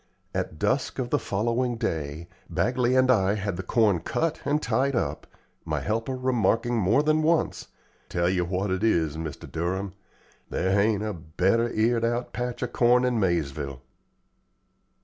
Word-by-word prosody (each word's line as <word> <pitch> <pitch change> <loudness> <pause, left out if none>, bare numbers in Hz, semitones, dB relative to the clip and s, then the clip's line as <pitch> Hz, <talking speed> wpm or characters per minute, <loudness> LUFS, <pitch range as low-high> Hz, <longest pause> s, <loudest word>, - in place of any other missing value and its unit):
At 80 - -3
dusk 130 - 0
of 125 -2 -3
the - - +3
following 120 +4 -1
day, 80 -7 -3 0.2
Bagley 125 0 +1
and 130 0 +5
I 100 -4 +3
had 100 -2 -2
the 90 - -4
corn 100 -1 +2
cut 160 - -2
and 150 +1 +2
tied 140 -2 0
up, 120 - -2 0.4
my - - -2
helper 115 +5 -2
remarking 120 -2 +1
more 110 +6 +3
than 155 +1 +2
once, 160 +1 +1 0.4
"Tell 85 0 0
you 90 -1 +1
what 95 +3 -2
it 95 +2 -1
is, 80 -9 +2
Mr. 80 -2 -6
Durham, 95 +4 -2 0.6
there 95 - 0
hain't 105 +1 +2
a 110 -1 -2
better 95 +8 0
eared 115 +1 +1
out 120 +1 -1
patch 125 0 -3
o' - - 0
corn 120 +1 +3
in 125 -2 +1
Maizeville." 70 -7 -1
110 Hz, 160 wpm, -26 LUFS, 90-125 Hz, 0.6 s, and